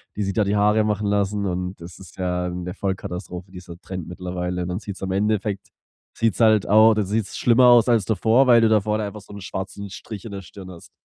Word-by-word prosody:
die 105 - -3
sich 100 -1 -1
da 110 - +3
die 100 +1 0
Haare 105 +1 +3
machen 105 -1 -1
lassen, 100 0 0
und 90 0 -3
das 85 0 -10
ist 95 -4 -14
ja 90 -1 -1
'ne 90 0 -6
Vollkatastrophe, 95 -1 -5
dieser 90 -2 -10
Trend 90 -4 -7
mittlerweile. 90 0 -4
Und 90 - -3
dann 90 +1 -3
sieht's 100 -3 -8
im 95 -1 -3
Endeffekt, 105 0 -1 0.5
sieht's 115 -5 0
halt 110 -3 +4
auch 110 +2 +7
dann 105 -1 0
sieht's 105 +1 -2
schlimmer 120 +1 +4
aus 120 0 +6
als 115 -4 +3
davor, 115 +4 +3
weil 120 -2 +6
du 115 - +4
da 110 -1 +4
vorne 105 +1 -1
einfach 105 +1 -7
so 100 - -14
'n 100 - -9
schwarzen 95 +2 -6
Strich 100 +2 -9
in 110 - -7
der 100 - -6
Stirn 95 +1 -11
hast. 85 -2 -13
100 Hz, 235 wpm, -22 LUFS, 90-110 Hz, 0.5 s, auch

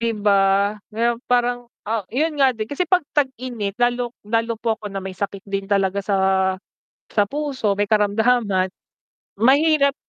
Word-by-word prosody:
'Di 230 - 0
ba? 205 -1 +4 0.6
Kaya 235 +1 0
parang 245 0 +1 0.2
ah, 220 -4 -1
yun 300 +3 -1
nga 265 -2 +4
din 220 -1 -5
kasi 345 +5 -1
'pag 365 -2 +4
tag-init 255 -7 -2
lalo 245 0 0
lalo 230 +2 0
po 225 0 -1
ako 210 - -8
na 195 -1 -4
may 190 0 -6
sakit 200 0 -4
din 195 -1 -3
talaga 195 -1 +1
sa 200 0 -1 0.9
sa 210 - +2
puso, 280 -8 -1
may 205 - +2
karamdaman. 210 -2 +2 0.7
Mahirap 280 +2 +4
230 Hz, 155 wpm, -21 LUFS, 205-255 Hz, 0.9 s, ba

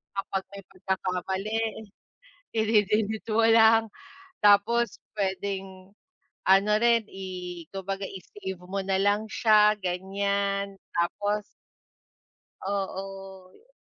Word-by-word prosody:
kapag 195 -1 -2
may 200 - -9
pagkakamali 190 +2 -2 1.0
idi-delete 220 0 +1
mo 225 +1 +4
lang 225 0 +6 0.6
tapos 210 +2 +4 0.2
puwedeng 190 -1 -3 0.5
ano 195 +2 +5
rin 235 -1 +4
i 180 -2 -7
kumbaga 195 0 -4
i-save 190 0 -8
mo 195 +2 -3
na 190 0 0
lang 205 +2 +2
siya 210 +1 +4
ganyan, 200 +2 -1 0.2
tapos 205 +4 0 1.2
Oo. 195 - -6
195 Hz, 85 wpm, -27 LUFS, 190-210 Hz, 1.2 s, lang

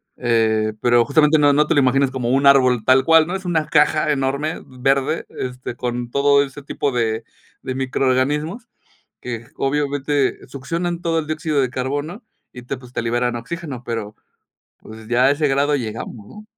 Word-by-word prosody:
Eh, 110 -2 +1
pero, 120 -1 +4
justamente, 150 +1 +3
no 145 -1 +5
no 150 +2 +3
te - - +1
lo - - +4
imaginas 135 0 +2
como 125 -3 -3
un 135 +2 +2
árbol 130 -4 +5
tal 130 +1 +5
cual, 160 +1 +6
¿no?, 180 - -3
es 190 - -6
una 165 -3 0
caja 150 0 +3
enorme, 140 +3 -2
verde, 135 +4 0
este, 125 -1 -6
con 120 -1 -4
todo 140 0 +4
ese 140 +1 -9
tipo 140 0 -2
de 115 -2 -1 0.4
de 130 - -4
microorganismos, 135 - -1 0.5
que 120 -1 -6
obviamente 145 0 0
succionan 170 +5 -4
todo 165 -1 0
el 155 - -3
dióxido 155 -2 -1
de 130 - 0
carbono 145 - -4 0.3
y 125 - -10
te 130 +3 -5
pues, 125 -1 -15
te - - -2
liberan 120 +1 0
oxígeno. 130 +2 -6
Pero, 110 -3 -4 0.6
pues, 110 +1 -13
ya 120 +1 +3
a 135 - +5
ese 145 0 0
grado 140 +2 +2
llegamos, 115 -4 -5
¿no? 210 - -13
135 Hz, 175 wpm, -20 LUFS, 125-150 Hz, 0.6 s, cual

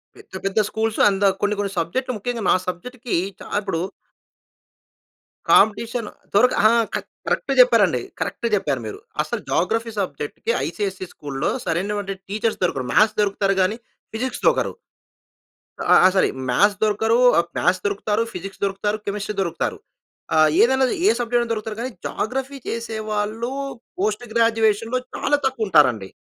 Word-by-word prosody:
పెద్ద, 410 - -18
పెద్ద 195 +2 +1
స్కూల్స్ 220 0 -2
అంద 195 0 -1 0.2
కొన్ని, 205 0 +1
కొన్ని 200 -1 -1
సబ్జెక్ట్‌‌లు 255 +10 -2
ముఖ్యంగా 235 +2 -3
నా - - +5
సబ్జెక్ట్‌కి 240 +7 -4 0.2
చా - - -10
ఇప్పుడు 195 -5 -2 1.7
కాంపిటీషన్ 225 +2 +3 0.3
దొరక 245 +5 +5 0.2
ఆా! - - +4 0.2
కర - - -1 0.3
కరెక్ట్‌గా - - 0
చెప్పారండి. - - +4 0.2
కరెక్ట్‌గా 235 - -2
చెప్పారు 140 -10 -1
మీరు. 105 - -6 0.2
అసలు - - -3
జోగ్రఫీ 225 +6 0
సబ్జెక్ట్‌కి 150 +3 -3
ఐసీఎస్‌ఈ 190 +1 -3
స్కూల్‌లో 140 -1 -3 0.2
సరైనటువంటి 195 +3 -2
టీచర్స్ 215 +3 -1
దొరకరు. 135 -8 0
మ్యాథ్స్ 215 0 +4
దొరుకుతారు 195 -1 +1
గానీ, 195 +4 +1 0.3
ఫిజిక్స్ 245 +3 -4
దొరకరు. - - +2 1.1
అ - - -5
ఆ! - - +8 0.2
సరి. 190 - +4 0.2
మ్యాథ్స్ 205 +11 +3
దొరకరు 220 +2 +2 0.2
ఆహ్, 170 - +2
మ్యాథ్స్ 185 +1 +2
దొరుకుతారు. 205 +2 0
ఫిజిక్స్ 195 +2 -8
దొరుకుతారు, 200 +2 -1
కెమిస్ట్రీ 205 +1 -3
దొరుకుతారు. 170 -4 -1 0.6
ఆహ్, 155 0 +6
ఏదనది 260 +1 +3
ఏ - - +7
సబ్జెక్టయినా 240 0 0
దొరుకుతారు 215 -1 -3
కానీ, 255 - -3 0.2
జాగ్రఫీ 265 +4 -3
చేసేవాళ్ళు 220 0 -3 0.5
పోస్ట్ 210 +4 0
గ్రాడ్యువేషన్‌లో 225 +1 +2 0.2
చాలా 290 - +1
తక్కువుంటారండి. 150 - +2
210 Hz, 135 wpm, -22 LUFS, 195-230 Hz, 1.7 s, ఆ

